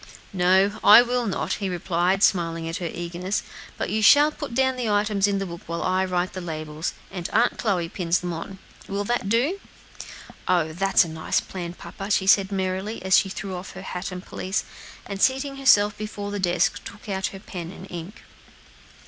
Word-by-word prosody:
"No, 190 Hz, +3 st, +3 dB
I 215 Hz, +4 st, +9 dB
will 245 Hz, -1 st, -1 dB
not," 195 Hz, -, -1 dB
he 195 Hz, -, -1 dB
replied, 180 Hz, +2 st, 0 dB
smiling 165 Hz, -3 st, +2 dB
at 165 Hz, -, -3 dB
her 175 Hz, -2 st, -3 dB
eagerness; 175 Hz, +3 st, -3 dB, 0.4 s
"you 220 Hz, -, -1 dB
shall 290 Hz, +7 st, +7 dB
put 290 Hz, -6 st, -7 dB
down 260 Hz, 0 st, +2 dB
the 245 Hz, -3 st, -2 dB
items 205 Hz, -1 st, +2 dB
in 200 Hz, -1 st, 0 dB
the 195 Hz, -, -2 dB
book, 170 Hz, -1 st, -8 dB
while 170 Hz, 0 st, -3 dB
I 185 Hz, 0 st, +1 dB
write 180 Hz, 0 st, -1 dB
the 185 Hz, -, -5 dB
labels, 155 Hz, -1 st, -4 dB, 0.2 s
and 180 Hz, -2 st, -5 dB
Aunt 240 Hz, -, +2 dB
Chloe 185 Hz, -7 st, 0 dB
pins 170 Hz, 0 st, 0 dB
them 175 Hz, -1 st, -4 dB
on. 165 Hz, +4 st, -7 dB, 0.3 s
Will 200 Hz, +1 st, -2 dB
that 220 Hz, -2 st, -1 dB
do?" 265 Hz, -, +1 dB, 0.9 s
"Oh! 170 Hz, -4 st, +2 dB
that's 195 Hz, +1 st, +3 dB
a -, -, -7 dB
nice 160 Hz, 0 st, -1 dB
plan, 175 Hz, -2 st, -6 dB
papa," 195 Hz, +2 st, -8 dB
she 195 Hz, -2 st, +2 dB
said 195 Hz, 0 st, +5 dB
gayly, 190 Hz, +2 st, -3 dB
as 190 Hz, 0 st, +5 dB
she 195 Hz, -, +4 dB
threw 195 Hz, 0 st, -5 dB
off 180 Hz, +1 st, -7 dB
her 190 Hz, -, -9 dB
hat 180 Hz, 0 st, -5 dB
and 180 Hz, +1 st, -7 dB
pelisse, 190 Hz, +3 st, -2 dB, 0.4 s
and 195 Hz, -1 st, -6 dB
seating 270 Hz, +1 st, +1 dB
herself 210 Hz, -6 st, +5 dB
before 205 Hz, -1 st, -5 dB
the 205 Hz, -, -3 dB
desk, 175 Hz, -2 st, +1 dB
took 210 Hz, -, -11 dB
out 190 Hz, -1 st, -1 dB
her 195 Hz, -, -9 dB
pen 175 Hz, -3 st, -7 dB
and 190 Hz, -, -10 dB
ink. 175 Hz, +5 st, -8 dB
190 Hz, 195 wpm, -24 LUFS, 175-210 Hz, 0.9 s, I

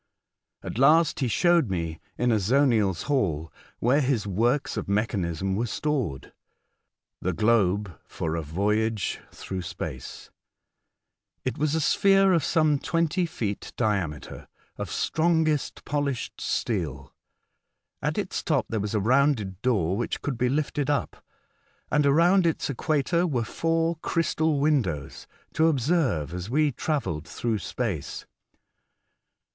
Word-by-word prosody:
At -, -, -5 dB
last 155 Hz, +5 st, +5 dB
he 130 Hz, -, +1 dB
showed 170 Hz, -, +3 dB
me, 85 Hz, -4 st, -3 dB, 0.2 s
in 125 Hz, 0 st, +2 dB
Azoniel's 110 Hz, -, +2 dB
hall 80 Hz, -, -1 dB, 0.2 s
(where 130 Hz, +6 st, +3 dB
his 130 Hz, -6 st, 0 dB
works 115 Hz, +8 st, 0 dB
of 105 Hz, -3 st, -4 dB
mechanism 95 Hz, -3 st, -1 dB
were 115 Hz, +4 st, -1 dB
stored) 130 Hz, -, -2 dB, 0.9 s
the 90 Hz, -, -1 dB
globe 100 Hz, -, +1 dB
for 80 Hz, 0 st, -3 dB
a 85 Hz, -, -1 dB
voyage 105 Hz, +7 st, -1 dB
through 95 Hz, -1 st, -6 dB
space. 65 Hz, -7 st, -7 dB, 1.1 s
It -, -, -2 dB
was 155 Hz, +1 st, +1 dB
a -, -, +1 dB
sphere 195 Hz, +4 st, +4 dB
of 165 Hz, -5 st, +2 dB
some 155 Hz, -2 st, +2 dB
twenty 170 Hz, +3 st, 0 dB
feet 105 Hz, -9 st, -4 dB
diameter, 95 Hz, -, -2 dB, 0.3 s
of -, -, -5 dB
strongest 160 Hz, -2 st, 0 dB
polished 140 Hz, -3 st, -2 dB
steel. 75 Hz, -, -2 dB, 0.9 s
At -, -, -1 dB
its -, -, -2 dB
top -, -, +1 dB
there 110 Hz, -, -1 dB
was 105 Hz, +1 st, -2 dB
a -, -, +3 dB
rounded 115 Hz, -4 st, +2 dB
door 100 Hz, -8 st, +1 dB
which 120 Hz, +3 st, -3 dB
could 145 Hz, -, -2 dB
be 125 Hz, +2 st, +1 dB
lifted 145 Hz, 0 st, -1 dB
up, 145 Hz, -1 st, -2 dB, 0.7 s
and 150 Hz, -1 st, +3 dB
around 170 Hz, +5 st, +4 dB
its 160 Hz, -3 st, -1 dB
equator 155 Hz, +6 st, +1 dB
were 125 Hz, -7 st, 0 dB
four 165 Hz, +5 st, 0 dB
crystal 160 Hz, -2 st, 0 dB
windows, 115 Hz, -, -1 dB, 0.3 s
to 160 Hz, -, +3 dB
observe 135 Hz, -, +1 dB
as 90 Hz, +3 st, -5 dB
we 150 Hz, +3 st, +2 dB
travelled 120 Hz, -, -2 dB
through 115 Hz, -3 st, -2 dB
space. 100 Hz, -, -4 dB
120 Hz, 130 wpm, -26 LUFS, 95-150 Hz, 1.1 s, last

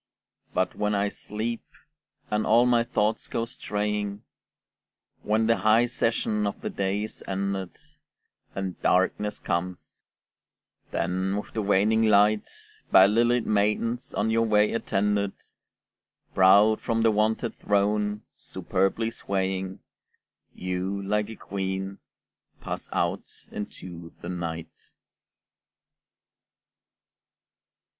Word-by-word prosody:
But -, -, +1 dB
when 105 Hz, 0 st, 0 dB
I 100 Hz, 0 st, +1 dB
sleep, 110 Hz, +3 st, -4 dB, 0.7 s
and 105 Hz, 0 st, +1 dB
all 115 Hz, +3 st, +5 dB
my 120 Hz, -1 st, +4 dB
thoughts 110 Hz, -2 st, 0 dB
go 115 Hz, -, -2 dB
straying, 105 Hz, -2 st, -3 dB, 1.0 s
When 110 Hz, +1 st, +1 dB
the 115 Hz, 0 st, +3 dB
high 110 Hz, +2 st, +4 dB
session 115 Hz, -3 st, 0 dB
of 100 Hz, -, -4 dB
the -, -, -3 dB
day 100 Hz, +1 st, -1 dB
is 110 Hz, -, -5 dB
ended, 95 Hz, -2 st, -3 dB, 0.8 s
And 95 Hz, -2 st, -4 dB
darkness 105 Hz, +3 st, +1 dB
comes; 90 Hz, 0 st, -4 dB, 0.9 s
then, 95 Hz, +3 st, -1 dB
with 105 Hz, -, -6 dB
the 110 Hz, -, -1 dB
waning 105 Hz, +2 st, +3 dB
light, 105 Hz, -1 st, +4 dB, 0.4 s
By 95 Hz, 0 st, +9 dB
lilied 120 Hz, +3 st, +3 dB
maidens 105 Hz, +4 st, 0 dB
on 110 Hz, +2 st, +1 dB
your 115 Hz, 0 st, +2 dB
way 105 Hz, -1 st, +3 dB
attended, 100 Hz, -2 st, 0 dB, 1.0 s
Proud 100 Hz, +3 st, +6 dB
from 115 Hz, -1 st, 0 dB
the 115 Hz, -, +5 dB
wonted 110 Hz, +2 st, 0 dB
throne, 105 Hz, +1 st, +1 dB
superbly 95 Hz, +5 st, -1 dB
swaying, 95 Hz, -2 st, -3 dB, 0.7 s
You, 90 Hz, +2 st, -3 dB
like 105 Hz, +2 st, 0 dB
a 110 Hz, -, -7 dB
queen, 95 Hz, 0 st, -4 dB, 0.6 s
pass -, -, -5 dB
out -, -, -1 dB, 0.2 s
into 85 Hz, -4 st, -8 dB
the 85 Hz, -, -5 dB
night. 85 Hz, -2 st, -6 dB
105 Hz, 105 wpm, -26 LUFS, 95-110 Hz, 1.0 s, By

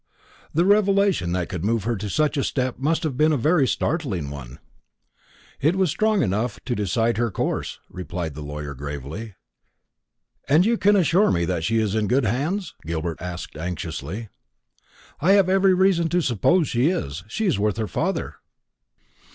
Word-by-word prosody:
"The 170 Hz, +3 st, +2 dB
revelation 200 Hz, -, +3 dB
that 90 Hz, -1 st, -1 dB
could 90 Hz, -4 st, -5 dB
move 110 Hz, 0 st, +1 dB
her 115 Hz, +2 st, 0 dB
to 105 Hz, +1 st, -5 dB
such 155 Hz, +6 st, +1 dB
a 140 Hz, -, 0 dB
step 130 Hz, -2 st, -2 dB
must 155 Hz, +5 st, 0 dB
have 150 Hz, -5 st, -2 dB
been 155 Hz, +4 st, +3 dB
a 150 Hz, -, +2 dB
very 150 Hz, +2 st, +3 dB
startling 110 Hz, -, -1 dB
one." 65 Hz, -4 st, -9 dB, 1.0 s
"It 155 Hz, +6 st, +2 dB
was 190 Hz, -4 st, +2 dB
strong 215 Hz, +2 st, +2 dB
enough 105 Hz, +6 st, -1 dB
to 125 Hz, -, -1 dB
decide 115 Hz, +2 st, 0 dB
her 120 Hz, 0 st, +1 dB
course," -, -, -2 dB
replied 90 Hz, -3 st, -5 dB
the 75 Hz, -, -8 dB
lawyer 75 Hz, 0 st, -6 dB
gravely. 75 Hz, -, -7 dB, 1.1 s
"And 155 Hz, +6 st, +5 dB
you 235 Hz, +2 st, +3 dB
can 205 Hz, +1 st, +4 dB
assure 185 Hz, +2 st, +4 dB
me 85 Hz, -1 st, +1 dB
that 85 Hz, -2 st, -2 dB
she 115 Hz, +6 st, +1 dB
is 110 Hz, -3 st, +1 dB
in 110 Hz, -1 st, 0 dB
good 125 Hz, +3 st, +2 dB
hands?" 155 Hz, -, -1 dB
Gilbert 80 Hz, 0 st, -4 dB
asked 90 Hz, -2 st, -6 dB
anxiously. 85 Hz, +4 st, -5 dB, 0.9 s
"I 185 Hz, +6 st, +4 dB
have 200 Hz, -2 st, +5 dB
every 190 Hz, 0 st, +4 dB
reason 180 Hz, -3 st, +3 dB
to 180 Hz, +2 st, +2 dB
suppose 150 Hz, -, +2 dB
so. 125 Hz, -, +1 dB, 0.2 s
She 220 Hz, -, -2 dB
is 145 Hz, -, +1 dB
with 105 Hz, 0 st, 0 dB
her 110 Hz, -2 st, -1 dB
father." -, -, -2 dB
115 Hz, 170 wpm, -23 LUFS, -, 1.1 s, And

